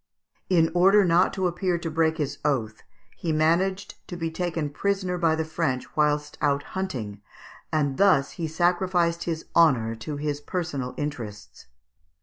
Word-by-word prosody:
In 165 -3 +3
order 195 +3 +5
not 175 +1 +4
to 190 -1 -1
appear 180 0 0
to 165 -1 -5
break 160 0 +1
his 145 -4 -3
oath, 115 -7 -1 0.3
he 165 - -3
managed 170 +5 +1
to 175 - -6
be 165 -1 -3
taken 160 -3 -2
prisoner 195 +2 -1
by 165 -2 +3
the 160 0 -2
French 155 -5 -2
whilst 150 -1 0
out 145 -1 +1
hunting, 120 - -4 0.5
and 145 -3 0
thus 180 -9 +4
he 165 - -4
sacrificed 175 +1 +1
his 165 -2 -3
honour 130 -10 +4
to 145 +7 -5
his 145 0 -3
personal 145 -7 -4
interests. 105 - -6
160 Hz, 150 wpm, -25 LUFS, 145-175 Hz, 0.5 s, order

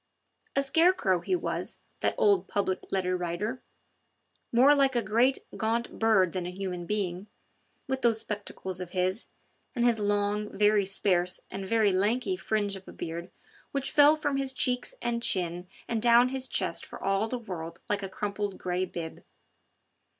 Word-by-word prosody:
A 275 - +3
scarecrow 275 - +3
he 370 - 0
was, 355 - -3 0.2
that - - 0
old 200 -3 +3
Public 195 -2 -2
Letter 185 -1 0
Writer, 180 +8 -3 0.9
more 260 +5 +6
like 275 -2 +3
a 240 - +2
great, 235 +6 +2
gaunt 230 +2 -2
bird 215 -6 +4
than 180 -2 -3
a - - -3
human 180 -2 -5
being, 195 -2 -2 0.6
with 265 0 -2
those 230 -3 +3
spectacles 200 -4 -5
of 180 - -5
his, 185 +4 0 0.5
and 240 -1 +2
his 235 -2 +3
long, 205 0 0
very 210 -1 +4
sparse 185 -2 +2
and 195 0 -5
very 220 -1 +3
lanky 200 +2 +1
fringe 205 +1 -1
of 190 0 -11
a - - -8
beard 170 +2 -6 0.4
which 275 -1 -2
fell 295 +1 +7
from 290 -3 -1
his 270 -1 0
cheeks 250 -1 0
and 235 -1 -1
chin 180 -4 -1 0.2
and 230 -2 -1
down 240 +1 +6
his 265 0 -2
chest - - -1
for - - -10
all 195 +2 +1
the 250 - -3
world 175 -7 -7
like 205 -1 0
a 195 - -4
crumpled 200 0 -3
grey 180 +1 -1
bib. 165 -3 -7
205 Hz, 165 wpm, -28 LUFS, 185-240 Hz, 0.9 s, fell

